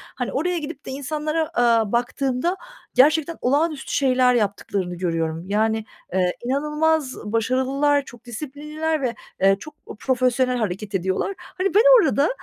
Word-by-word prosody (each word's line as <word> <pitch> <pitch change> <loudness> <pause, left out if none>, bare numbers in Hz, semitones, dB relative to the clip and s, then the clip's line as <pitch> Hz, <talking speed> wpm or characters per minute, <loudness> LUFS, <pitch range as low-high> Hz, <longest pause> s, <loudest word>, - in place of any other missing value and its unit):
hani 250 - -3
oraya 350 +6 0
gidip 300 -2 -6
de - - -6
insanlara, 305 +3 -2
aaa, 230 -5 +3
baktığımda 255 +6 0 0.4
gerçekten 310 +4 +3
olağanüstü 290 +3 0
şeyler 255 -2 +3
yaptıklarını 200 -4 -1
görüyorum. 165 -2 -2
Yani, 220 +1 +1 0.3
eee, 180 -1 +2
inanılmaz 300 +1 0
başarılılar, 260 +6 +1
çok 240 -1 -14
disiplinliler 300 +5 -4
ve, 245 -3 -1 0.3
eee, 195 0 +5
çok, 305 - -10
eee, - - -7
profesyonel 255 0 +1
hareket 205 -2 -3
ediyorlar. 190 - -1
Hani 375 0 -3
ben 430 - +7 0.2
orada, 285 -2 +2
260 Hz, 135 wpm, -22 LUFS, 220-300 Hz, 0.4 s, ben